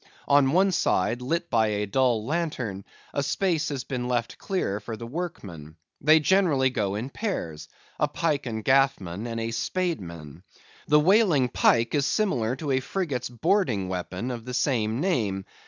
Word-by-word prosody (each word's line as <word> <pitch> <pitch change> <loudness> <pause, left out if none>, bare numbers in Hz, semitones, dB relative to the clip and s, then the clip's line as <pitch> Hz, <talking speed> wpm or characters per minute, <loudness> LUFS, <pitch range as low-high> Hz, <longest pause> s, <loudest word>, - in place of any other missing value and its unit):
On 140 -2 +4
one 190 +4 +4
side, 120 - +1
lit 170 +7 -2
by 110 -2 +3
a 105 0 -1
dull 115 0 +1
lantern, 130 - -3 0.3
a 140 - 0
space 165 +2 0
has 135 -3 -3
been 125 -2 -4
left 120 -2 -2
clear 140 - -2
for 110 +2 -7
the 115 - -7
workmen. 105 - -6 0.3
They 155 +2 +6
generally 155 -6 +3
go 100 -5 -1
in 120 +6 -4
pairs,—a 150 - -4
pike 145 -2 -1
and 110 -2 -4
gaffman 120 -7 +2
and 115 -1 -4
a 115 0 -2
spade 175 - -1
man. 85 -3 -10 0.5
The 150 0 +5
whaling 170 - +4
pike 115 0 +2
is 145 -3 +2
similar 130 - 0
to 145 0 -4
a 130 - +3
frigate's 140 -5 -3
boarding 120 - 0
weapon 95 +6 -4
of 120 -2 -6
the 125 -1 -4
same 115 -3 0
name. 105 - 0
125 Hz, 165 wpm, -26 LUFS, 110-155 Hz, 0.5 s, They